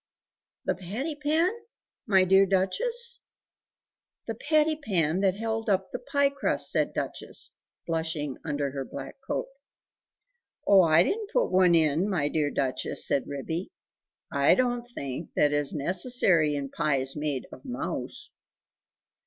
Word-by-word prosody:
"The - - +2
patty 220 - -4
pan? 310 +5 +1 0.6
my 190 -3 +5
dear 195 +1 +5
Duchess?" 470 - 0 1.1
"The 225 - -3
patty 310 +6 +2
pan 180 - 0
that 190 -2 +2
held 225 +1 -2
up 190 -1 +1
the - - -4
pie 280 +2 +1
crust," 280 - 0
said - - 0
Duchess, - - -4 0.3
blushing 160 -4 -2
under 145 -3 -2
her 135 0 -4
black - - -8
coat. - - -1 1.2
"Oh, 195 -2 +7
I 165 -1 +5
didn't 420 - -2
put - - +1
one 185 -2 +5
in, 160 +4 +2
my 155 -7 0
dear 150 -2 0
Duchess," 135 -3 -1
said 140 - 0
Ribby; 160 +6 -4 0.6
"I 140 0 +4
don't 245 -1 0
think 145 - -6
that 145 0 +3
it - - +2
is 145 -1 +2
necessary 175 - +2
in 140 -1 -3
pies 135 -4 +1
made 150 -3 -2
of - - -12
mouse." 255 -2 -5
185 Hz, 140 wpm, -27 LUFS, 150-245 Hz, 1.2 s, Oh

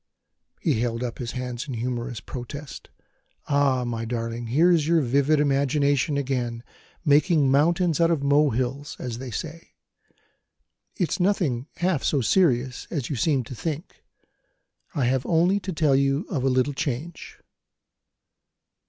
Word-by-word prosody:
He - - +1
held 115 0 -1
up 120 -2 -5
his 120 -2 -4
hands 125 +1 -4
in 130 - -4
humorous 120 -1 -3
protest: 135 +3 -8 0.6
"Ah, 140 -3 +2
my 115 -1 -3
darling, 115 0 -4
here's 160 +5 +3
your 165 -1 +4
vivid 140 +3 +2
imagination 140 0 +2
again, 125 -4 -2 0.4
making 145 -1 +4
mountains 170 +4 +2
out 165 - +4
of 160 -4 0
molehills, 140 -1 +1
as 120 -2 -5
they 130 -1 -6
say! 160 +7 -7 1.2
It's 175 -2 -1
nothing 170 -10 +1
half 175 -5 0
so 145 - +1
serious 130 - +1
as 145 -5 -3
you - - -1
seem 135 +1 +1
to 120 - -9
think; 160 - -6 0.9
I 140 -5 +1
have 130 +1 +1
only 175 +4 +3
to 195 - -5
tell 155 -5 +2
you 140 +5 +1
of 140 -8 -1
a 135 - +3
little 130 +2 +1
change." 145 +3 -5
140 Hz, 140 wpm, -25 LUFS, 125-155 Hz, 1.2 s, your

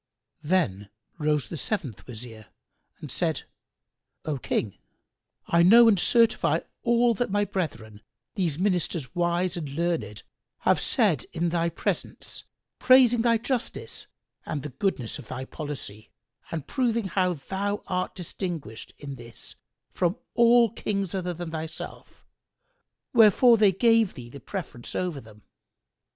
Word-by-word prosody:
Then 145 - 0 0.3
rose 150 -5 +1
the 165 - -6
seventh 150 - -4
Wazir 110 -3 -9 0.5
and - - -8
said, - - -1 0.8
"O 150 -3 -2
King, 105 -4 -2 0.7
I 170 - +3
know 230 +7 +8
and 205 -4 +5
certify 230 +4 +3 0.2
all 235 0 +3
that 240 +2 -1
my 205 +1 +1
brethren, 115 - -4 0.3
these 170 -6 -1
Ministers 180 -6 0
wise 175 0 0
and 160 -5 -4
learned, 160 -8 -2 0.4
have - - +3
said - - +2
in 170 +1 0
the 170 0 +1
presence, - - -3 0.3
praising 250 -2 +6
thy 230 -1 +3
justice 245 +1 -3 0.4
and 145 -3 -4
the 150 - -5
goodness 135 - -2
of 125 - -11
thy 130 0 -5
policy 130 -9 -7 0.4
and 160 -4 -4
proving 230 - 0
how 185 -1 +1
thou 195 +7 -3
art 185 0 -2
distinguished 170 - -6
in 140 -2 -7
this 120 -1 -10 0.4
from 180 +4 0 0.2
all 235 -1 +5
Kings 200 -4 -2
other 180 -2 -2
than 175 -1 -6
thyself; 160 0 -7 0.9
wherefore 230 +1 +7
they 210 -3 +5
gave 225 +1 +3
thee 120 -2 -9
the 140 - -9
preference 165 -11 -7
over 175 -6 -2
them. 105 -2 -17
175 Hz, 135 wpm, -26 LUFS, 140-205 Hz, 0.9 s, know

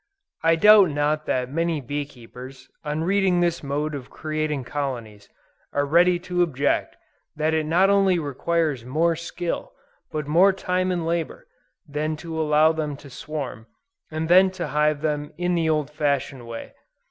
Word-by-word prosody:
I 165 0 +4
doubt 205 +1 +7
not 150 +1 -1
that 125 0 -1
many 165 +1 0
bee 145 +2 -3
keepers, 130 +1 -12 0.2
on 150 +1 -2
reading 190 0 +2
this 170 -1 +1
mode 145 +2 -2
of 135 -3 -7
creating 155 -2 -3
colonies, 120 -6 -5 0.4
are 145 0 +1
ready 175 +4 +4
to 180 0 -1
object 145 -4 0 0.4
that 155 +1 0
it 155 -1 0
not 185 +5 +4
only 195 -2 +3
requires 150 -2 -1
more 160 +7 +1
skill, 170 +1 -5 0.4
but 155 -1 -3
more 175 +7 +5
time 185 -1 -1
and 175 -2 -2
labor, 165 -1 -3 0.4
than 155 +2 -2
to 160 +1 -5
allow 155 +1 +4
them 150 -3 -3
to 140 -1 -14
swarm, 130 -5 -6 0.4
and 160 0 -3
then 185 +3 +6
to 180 -4 -5
hive 150 0 +1
them 150 0 -2
in 180 +1 0
the 165 -2 +1
old 150 -2 0
fashioned 140 -4 -2
way. 115 -1 -8
155 Hz, 160 wpm, -24 LUFS, 145-170 Hz, 0.4 s, doubt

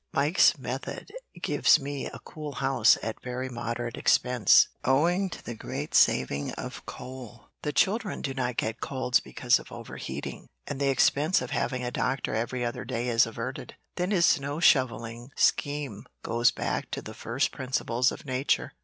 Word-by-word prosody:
Mike's 145 +6 +4
method - - -6 0.3
gives - - +4
me 140 -1 -4
a - - -8
cool 150 -2 -7
house 130 -5 +4
at 110 0 -4
very 125 +1 -4
moderate 120 -1 -4
expense, 125 -5 +5 0.2
owing 175 +9 +2
to - - -9
the 120 - -4
great 110 - -6
saving 70 +2 +3
of - - -7
coal, 125 -2 -9
the 150 - -2
children 205 +4 +1
do 135 - -2
not 125 -2 -2
get 110 +2 -2
colds 130 -1 +1
because 65 -2 +1
of - - -13
overheating, - - -7 0.2
and 140 - -5
the 140 - +3
expense 145 +5 +3
of - - -6
having 125 -2 -1
a 125 - -2
doctor 130 0 -1
every 120 +2 -1
other 120 - -3
day 120 +2 -2
is 115 -1 +4
averted. 115 +3 -6 0.2
Then 180 +1 -1
his 180 -5 +4
snow 145 0 +1
shovelling 120 -5 +2
scheme 145 -7 0 0.2
goes 120 +1 +3
back - - -3
to - - -4
the 110 - -8
first 120 +5 -1
principles 130 -1 0
of - - -9
nature. 130 0 0
130 Hz, 165 wpm, -28 LUFS, 120-140 Hz, 0.3 s, expense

